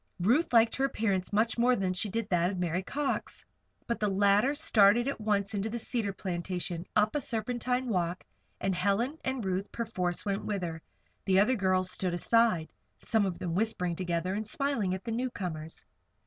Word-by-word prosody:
Ruth 240 Hz, -, +2 dB
liked 230 Hz, -1 st, +5 dB
her 270 Hz, -, +2 dB
appearance 200 Hz, -8 st, -1 dB
much 220 Hz, +3 st, +1 dB
more 250 Hz, +1 st, +4 dB
than 190 Hz, -4 st, -1 dB
she 195 Hz, +3 st, -2 dB
did 225 Hz, +1 st, -2 dB
that 175 Hz, -1 st, +2 dB
of 190 Hz, -, -4 dB
Mary 180 Hz, 0 st, -1 dB
Cox. 285 Hz, +8 st, -3 dB, 0.4 s
But 235 Hz, -, -2 dB
the 210 Hz, -, +1 dB
latter 200 Hz, +7 st, +3 dB
started 225 Hz, -3 st, +4 dB
at 275 Hz, -, -3 dB
once 205 Hz, -1 st, 0 dB
into 205 Hz, +1 st, -1 dB
the 235 Hz, -, -3 dB
cedar 225 Hz, -3 st, -2 dB
plantation, 180 Hz, -2 st, -4 dB
up 210 Hz, +3 st, +3 dB
a -, -, +2 dB
serpentine 245 Hz, +2 st, -1 dB
walk, 180 Hz, -4 st, -1 dB, 0.4 s
and 195 Hz, 0 st, 0 dB
Helen 205 Hz, -, 0 dB
and 260 Hz, -4 st, -2 dB
Ruth, 190 Hz, +1 st, -2 dB
perforce, 180 Hz, -6 st, -2 dB
went 200 Hz, -1 st, -1 dB
with 200 Hz, -3 st, -2 dB
her. 165 Hz, -2 st, -4 dB, 0.4 s
The 190 Hz, -1 st, +4 dB
other 215 Hz, +6 st, +4 dB
girls 185 Hz, -4 st, +1 dB
stood 180 Hz, -2 st, -1 dB
aside 215 Hz, -3 st, +2 dB, 0.2 s
some 220 Hz, -4 st, +1 dB
of 180 Hz, -, -4 dB
them 170 Hz, -2 st, -3 dB
whispering 180 Hz, -3 st, 0 dB
together 175 Hz, 0 st, -2 dB
and 210 Hz, +1 st, -3 dB
smiling 230 Hz, -8 st, 0 dB
at 190 Hz, -, -8 dB
the 230 Hz, -, -4 dB
newcomers. 180 Hz, -10 st, -4 dB
200 Hz, 185 wpm, -30 LUFS, 185-230 Hz, 0.4 s, liked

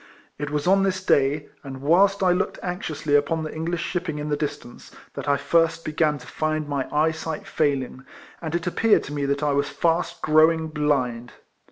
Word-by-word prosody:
It 145 Hz, -1 st, -3 dB
was 150 Hz, 0 st, -2 dB
on 195 Hz, +2 st, +4 dB
this 190 Hz, -1 st, -1 dB
day, 145 Hz, +2 st, +2 dB
and 135 Hz, -2 st, -8 dB
whilst 190 Hz, +7 st, +3 dB
I 185 Hz, -, +4 dB
looked 180 Hz, +1 st, 0 dB
anxiously 160 Hz, -5 st, -3 dB
upon 155 Hz, +3 st, +1 dB
the 155 Hz, -, -5 dB
English 165 Hz, +2 st, -3 dB
shipping 175 Hz, -4 st, -3 dB
in 150 Hz, 0 st, -4 dB
the 145 Hz, -, +1 dB
distance, 145 Hz, -5 st, -6 dB, 0.2 s
that -, -, -4 dB
I 140 Hz, -, +3 dB
first 165 Hz, +2 st, +1 dB
began 155 Hz, -1 st, +1 dB
to 125 Hz, -, -13 dB
find 155 Hz, +3 st, -2 dB
my 140 Hz, -2 st, -2 dB
eyesight 160 Hz, +1 st, -1 dB
failing, 135 Hz, -3 st, -1 dB, 0.4 s
and 160 Hz, 0 st, -3 dB
it 170 Hz, -, -2 dB
appeared 215 Hz, +5 st, +3 dB
to 145 Hz, -, -7 dB
me 145 Hz, -1 st, -1 dB
that 140 Hz, +1 st, -1 dB
I 145 Hz, -, +2 dB
was 140 Hz, +1 st, 0 dB
fast 165 Hz, +3 st, -1 dB
growing 160 Hz, +1 st, +4 dB
blind. 135 Hz, -6 st, -1 dB
155 Hz, 190 wpm, -24 LUFS, 145-165 Hz, 0.4 s, on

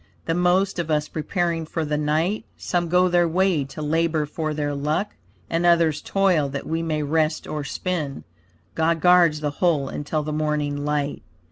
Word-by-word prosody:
The 165 Hz, -, 0 dB
most 180 Hz, +2 st, +2 dB
of 165 Hz, -2 st, -2 dB
us 150 Hz, -1 st, +1 dB
preparing 165 Hz, 0 st, -2 dB
for 160 Hz, 0 st, -2 dB
the 150 Hz, 0 st, -1 dB
night; 155 Hz, +7 st, 0 dB
Some 175 Hz, -2 st, -1 dB
go 180 Hz, +1 st, +4 dB
their 175 Hz, -1 st, +3 dB
way 180 Hz, -2 st, +2 dB
to 150 Hz, +3 st, -7 dB
labor 160 Hz, 0 st, +1 dB
for 155 Hz, +1 st, -3 dB
their 145 Hz, -1 st, -2 dB
luck, 150 Hz, +8 st, -1 dB, 0.4 s
And 165 Hz, +1 st, -1 dB
others 170 Hz, -3 st, +3 dB
toil 185 Hz, -7 st, +2 dB
that 140 Hz, 0 st, -5 dB
we 165 Hz, +1 st, -2 dB
may 155 Hz, -2 st, -1 dB
rest 155 Hz, +1 st, 0 dB
or 150 Hz, -1 st, -4 dB
spin. 155 Hz, -3 st, -3 dB, 0.5 s
God 165 Hz, +1 st, +1 dB
guards 175 Hz, -3 st, +5 dB
the 150 Hz, -1 st, -1 dB
whole 155 Hz, -7 st, +2 dB
until 150 Hz, +1 st, -3 dB
the 150 Hz, 0 st, -4 dB
morning 150 Hz, -1 st, -1 dB
light. 145 Hz, 0 st, -2 dB
160 Hz, 175 wpm, -23 LUFS, 150-175 Hz, 0.5 s, guards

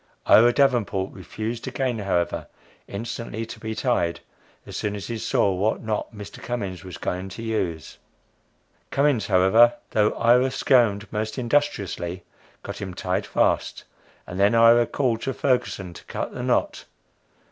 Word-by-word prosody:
Ira 120 Hz, +2 st, +7 dB
Davenport 120 Hz, -8 st, +1 dB
refused 110 Hz, +5 st, -5 dB
again, 125 Hz, -4 st, -1 dB
however, 90 Hz, -4 st, -1 dB, 0.4 s
instantly 115 Hz, +1 st, -5 dB
to -, -, -10 dB
be 110 Hz, 0 st, -5 dB
tied, 85 Hz, -11 st, 0 dB, 0.5 s
as -, -, -9 dB
soon 105 Hz, -1 st, -2 dB
as 100 Hz, -, -6 dB
he 115 Hz, -1 st, -4 dB
saw 100 Hz, -2 st, +1 dB
what 100 Hz, +6 st, 0 dB
knot 110 Hz, -1 st, -2 dB
Mr. 105 Hz, -2 st, -10 dB
Cummins 100 Hz, -7 st, -4 dB
was 90 Hz, -2 st, -8 dB
going 90 Hz, +2 st, -3 dB
to 115 Hz, +5 st, -8 dB
use. 90 Hz, -9 st, -3 dB, 0.9 s
Cummins, 140 Hz, -7 st, +1 dB
however, 100 Hz, +5 st, +5 dB, 0.2 s
though 105 Hz, -1 st, +2 dB
Ira 125 Hz, +3 st, +4 dB
squirmed 115 Hz, -7 st, +2 dB
most 110 Hz, 0 st, -3 dB
industriously, 105 Hz, -9 st, -1 dB, 0.4 s
got -, -, -7 dB
him 95 Hz, -3 st, -5 dB
tied 90 Hz, 0 st, -2 dB
fast, -, -, 0 dB, 0.4 s
and 90 Hz, -, -7 dB
then 100 Hz, +3 st, +4 dB
Ira 115 Hz, +1 st, +6 dB
called 120 Hz, -5 st, 0 dB
to 135 Hz, -, -3 dB
Ferguson 115 Hz, -9 st, -1 dB
to -, -, -12 dB
cut -, -, -4 dB
the -, -, -5 dB
knot! -, -, 0 dB
110 Hz, 145 wpm, -24 LUFS, 95-120 Hz, 0.9 s, Ira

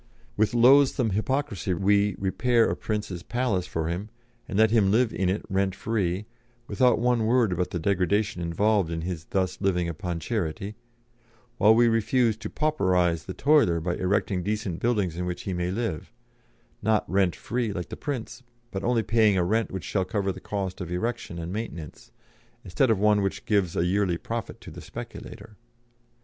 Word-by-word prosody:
With 110 Hz, +3 st, +1 dB
loathsome 125 Hz, -1 st, +5 dB
hypocrisy 110 Hz, -3 st, -1 dB
we 100 Hz, +2 st, +2 dB
repair 115 Hz, +5 st, +2 dB
a -, -, -1 dB
prince's 105 Hz, -5 st, -4 dB
palace 115 Hz, -4 st, -1 dB
for 80 Hz, -1 st, -2 dB
him, 90 Hz, +6 st, -3 dB, 0.4 s
and 95 Hz, -, -3 dB
let 110 Hz, 0 st, +5 dB
him 110 Hz, -4 st, +4 dB
live 115 Hz, +3 st, +2 dB
in 95 Hz, -2 st, 0 dB
it 100 Hz, +3 st, -2 dB
rent 95 Hz, 0 st, 0 dB
free, 100 Hz, -3 st, -1 dB, 0.4 s
without 125 Hz, +4 st, +3 dB
one 120 Hz, -2 st, +1 dB
word 120 Hz, -3 st, +3 dB
about 90 Hz, +1 st, -1 dB
the -, -, -3 dB
degradation 95 Hz, +2 st, 0 dB
involved 95 Hz, +2 st, +1 dB
in 80 Hz, -1 st, -3 dB
his 85 Hz, -2 st, -5 dB
thus 95 Hz, 0 st, -2 dB
living 90 Hz, -3 st, +1 dB
upon 85 Hz, +1 st, -4 dB
charity; 100 Hz, +1 st, -3 dB, 0.9 s
while 110 Hz, +1 st, +6 dB
we 120 Hz, +1 st, +5 dB
refuse 115 Hz, +1 st, +2 dB
to 110 Hz, -1 st, -6 dB
'pauperise' 90 Hz, -, +1 dB
the 95 Hz, -, -6 dB
toiler 140 Hz, -, +3 dB
by 85 Hz, +2 st, -2 dB
erecting 95 Hz, 0 st, 0 dB
decent 100 Hz, -3 st, -3 dB
buildings 105 Hz, -8 st, 0 dB
in 90 Hz, 0 st, -2 dB
which 90 Hz, 0 st, -4 dB
he 95 Hz, -, -3 dB
may 90 Hz, 0 st, -1 dB
live 95 Hz, -4 st, -3 dB, 0.7 s
not 110 Hz, -1 st, +1 dB
rent 95 Hz, -3 st, +1 dB
free 120 Hz, -1 st, -2 dB
like 90 Hz, -3 st, -5 dB
the -, -, -5 dB
prince, 125 Hz, -4 st, -5 dB, 0.3 s
but 95 Hz, -1 st, -4 dB
only 120 Hz, -2 st, +2 dB
paying 110 Hz, -1 st, +3 dB
a 90 Hz, -, +2 dB
rent 110 Hz, +5 st, +1 dB
which 95 Hz, -2 st, -5 dB
shall 95 Hz, -, 0 dB
cover 100 Hz, +1 st, -1 dB
the -, -, -8 dB
cost 95 Hz, -2 st, -4 dB
of 90 Hz, -1 st, -5 dB
erection 115 Hz, -1 st, -3 dB
and 85 Hz, +2 st, -5 dB
maintenance, 85 Hz, -9 st, -7 dB, 0.5 s
instead 120 Hz, +9 st, +1 dB
of 110 Hz, -, +3 dB
one 105 Hz, +1 st, +3 dB
which 95 Hz, -1 st, -3 dB
gives 100 Hz, -5 st, +1 dB
a 85 Hz, -, +1 dB
yearly 95 Hz, -1 st, +1 dB
profit -, -, -5 dB
to -, -, -11 dB
a -, -, -8 dB
speculator. 105 Hz, 0 st, -9 dB
100 Hz, 180 wpm, -26 LUFS, 90-115 Hz, 0.9 s, while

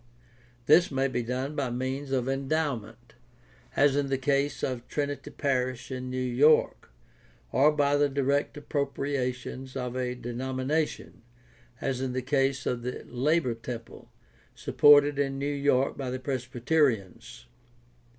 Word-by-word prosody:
This 175 Hz, +7 st, +6 dB
may 135 Hz, -1 st, +1 dB
be 125 Hz, -2 st, -2 dB
done 130 Hz, +5 st, -3 dB
by 140 Hz, -3 st, -1 dB
means 130 Hz, +3 st, -3 dB
of 130 Hz, -2 st, 0 dB
endowment, 135 Hz, -5 st, -2 dB, 0.6 s
as 145 Hz, -1 st, +4 dB
in 145 Hz, -1 st, +1 dB
the 135 Hz, 0 st, 0 dB
case 140 Hz, +2 st, 0 dB
of 125 Hz, -2 st, -3 dB
Trinity 145 Hz, -1 st, -3 dB
Parish 130 Hz, -2 st, -2 dB
in 130 Hz, 0 st, -4 dB
New 130 Hz, -, -4 dB
York, 130 Hz, +5 st, +3 dB, 0.6 s
or 145 Hz, +3 st, +5 dB
by 145 Hz, -1 st, +2 dB
the 145 Hz, 0 st, +3 dB
direct 140 Hz, +1 st, 0 dB
appropriations 135 Hz, -3 st, -3 dB
of 125 Hz, -2 st, -3 dB
a 125 Hz, -1 st, -2 dB
denomination, 130 Hz, +5 st, -3 dB, 0.6 s
as 130 Hz, -2 st, -2 dB
in 130 Hz, -1 st, -2 dB
the 130 Hz, 0 st, -2 dB
case 135 Hz, 0 st, +1 dB
of 120 Hz, -1 st, -1 dB
the 125 Hz, +1 st, -5 dB
Labor 135 Hz, +1 st, +1 dB
Temple, 115 Hz, 0 st, -8 dB, 0.5 s
supported 145 Hz, -1 st, +5 dB
in 135 Hz, -1 st, 0 dB
New 140 Hz, -, -3 dB
York 140 Hz, -2 st, +1 dB
by 135 Hz, -2 st, -3 dB
the 130 Hz, +1 st, -3 dB
Presbyterians. 125 Hz, -, -1 dB
135 Hz, 135 wpm, -28 LUFS, 125-140 Hz, 0.6 s, This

